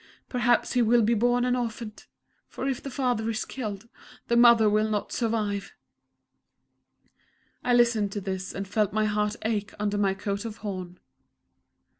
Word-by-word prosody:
Perhaps 245 -1 +2
he 250 - +3
will 235 0 +4
be 225 +3 +3
born 245 +2 +2
an 250 0 +2
orphan 230 -2 -4 0.5
for 265 - -5
if 265 -3 -2
the 275 - -6
father 245 -4 -1
is 225 +1 -2
killed, 215 -4 -6 0.4
the 235 - +3
mother 235 -2 +7
will 215 +1 +2
not 210 -1 -2
survive!" 215 -4 -2 1.9
I 245 0 +3
listened 235 -4 +3
to 205 - -2
this 190 -1 -4
and 195 0 -5
felt 205 0 0
my 215 0 +2
heart 210 0 0
ache 215 -2 -2
under 205 0 -1
my 195 -1 +2
coat 200 0 -3
of 225 -1 -6
horn. 185 -3 -5
220 Hz, 160 wpm, -27 LUFS, 205-240 Hz, 1.9 s, mother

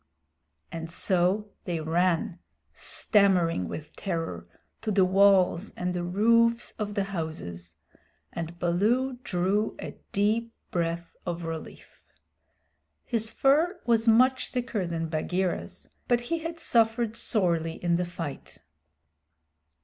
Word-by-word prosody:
And 165 0 -5
so 185 +4 +1
they 170 -3 -2
ran, 175 +4 0 0.3
stammering 180 - +2
with 150 - -8
terror, 165 - -4 0.3
to 220 - -3
the 195 -2 +4
walls 190 0 +4
and 180 0 -2
the 175 -1 -2
roofs 230 +6 +3
of 205 -1 -3
the 200 - +1
houses, 155 - -5 0.6
and 170 0 -5
Baloo 230 +10 +1
drew 195 +2 0
a - - -5 0.2
deep 220 +3 0 0.2
breath 170 0 -2
of 175 -1 -4
relief. 165 -1 -8 1.0
His 225 -2 0
fur 315 - +2
was 230 -1 +2
much 255 +3 +4
thicker 240 -7 -2
than 165 -1 -2
Bagheera's, 175 +3 -2 0.2
but 240 -1 +3
he 330 +8 -2
had 330 +1 -6
suffered 225 -2 +2
sorely 170 -8 +1
in 170 0 0
the 180 - 0
fight. 165 -5 -7
190 Hz, 120 wpm, -27 LUFS, 170-225 Hz, 1.0 s, the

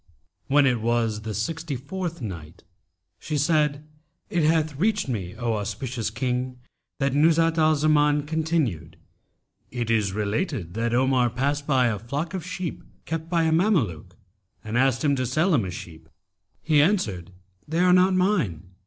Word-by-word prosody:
When 145 +1 +4
it 125 -4 +1
was 115 -2 0
the 110 0 -5
Sixty 160 - -3
fourth 170 +5 -5
Night, 85 -7 -8 0.6
She 155 -1 -3
said, 150 -1 +1 0.5
It 175 - +1
hath 155 -1 +2
reached 210 -1 +1
me, 95 -8 -4
O 120 -2 -1
auspicious 110 +3 -3
King, 125 +2 -2 0.4
that 135 -1 0
Nuzhat 165 +2 +3
al 155 0 +4
Zaman 150 -1 +2
continued, 150 - -1 0.7
"It 120 -2 -3
is 105 -4 +1
related 105 - -2
that 115 +2 -1
Omar 130 -1 +3
passed 140 +4 -2
by 130 -3 +3
a 110 -4 0
flock 145 - -4
of 185 -3 -4
sheep, 180 -1 -5 0.2
kept 165 0 -4
by 170 -2 +2
a 160 - +2
Mameluke, 125 - +1 0.5
and 110 +1 -5
asked 130 0 +2
him 140 -1 +3
to 130 - -1
sell 155 +9 +1
him 120 -9 +2
a - - -4
sheep. 80 -2 -10 0.5
He 155 -2 +4
answered, 110 - 0 0.4
'They 165 +3 0
are 180 0 +5
not 185 +1 +4
mine.' 135 - 0
135 Hz, 160 wpm, -25 LUFS, 110-160 Hz, 0.7 s, are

